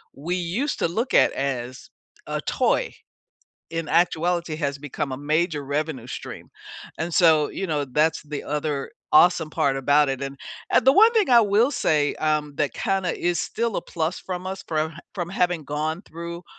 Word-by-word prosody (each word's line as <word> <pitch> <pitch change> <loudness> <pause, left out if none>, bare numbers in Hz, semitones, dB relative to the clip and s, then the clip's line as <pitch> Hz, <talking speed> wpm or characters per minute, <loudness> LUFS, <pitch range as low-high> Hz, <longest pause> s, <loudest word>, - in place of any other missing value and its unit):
we 170 +6 -3
used 185 - -2
to - - +2
look 225 +10 -2
at - - +5
as 130 -2 -4 0.4
a - - -3
toy, - - 0 0.8
in 165 -1 -3
actuality 170 0 +1
has 140 -3 -2
become 140 -1 -4
a 130 - -3
major 150 +1 0
revenue 145 -3 -3
stream. - - -8 0.5
And 165 +2 -3
so, 155 -4 +5
you 195 - -4
know, 150 -4 -1
that's 150 +4 +1
the 150 -1 -6
other 150 -1 -3 0.2
awesome 165 -1 +5
part 135 -3 +1
about 145 +2 +3
it. 135 0 -3
And, 135 0 -5 0.3
uh, - - +6
the 265 - +5
one 440 +7 +7
thing 425 - +2
I 235 - +8
will 220 +6 +3
say, 150 -2 +1
um, 150 -2 -1
that 145 -2 -1
kinda 190 -3 -1
is 175 0 0
still 230 -2 -2
a - - -2
plus 165 +1 -3
from 185 0 -5
us 190 0 -5
from 160 0 -1
h 160 - -13 0.2
from 175 -3 -3
having 175 -4 0
gone 155 +4 -3
through 170 0 -8
160 Hz, 180 wpm, -24 LUFS, 145-180 Hz, 0.8 s, I